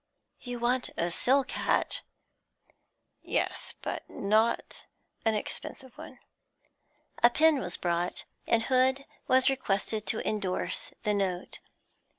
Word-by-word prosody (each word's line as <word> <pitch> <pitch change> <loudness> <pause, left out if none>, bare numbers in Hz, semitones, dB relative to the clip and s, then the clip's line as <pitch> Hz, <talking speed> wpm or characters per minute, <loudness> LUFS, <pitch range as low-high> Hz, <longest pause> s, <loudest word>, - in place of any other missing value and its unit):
'You 245 -1 -5
want 245 +2 +1
a 170 +1 0
silk 265 +9 +2
hat?' - - +1 1.2
'Yes, - - -1
but - - -4
not 215 +3 0 0.4
an 220 -1 +3
expensive 255 +4 -6
one.' - - -10 1.0
A 240 - +8
pen 310 +3 +4
was 175 -7 -3
brought, 175 0 -1 0.2
and 225 -1 +3
Hood 260 +2 +2 0.2
was 260 0 +4
requested 215 -4 -1
to 220 - 0
endorse 200 -4 -2
the 210 -2 +2
note. 190 -3 -2
225 Hz, 115 wpm, -29 LUFS, 195-260 Hz, 1.2 s, A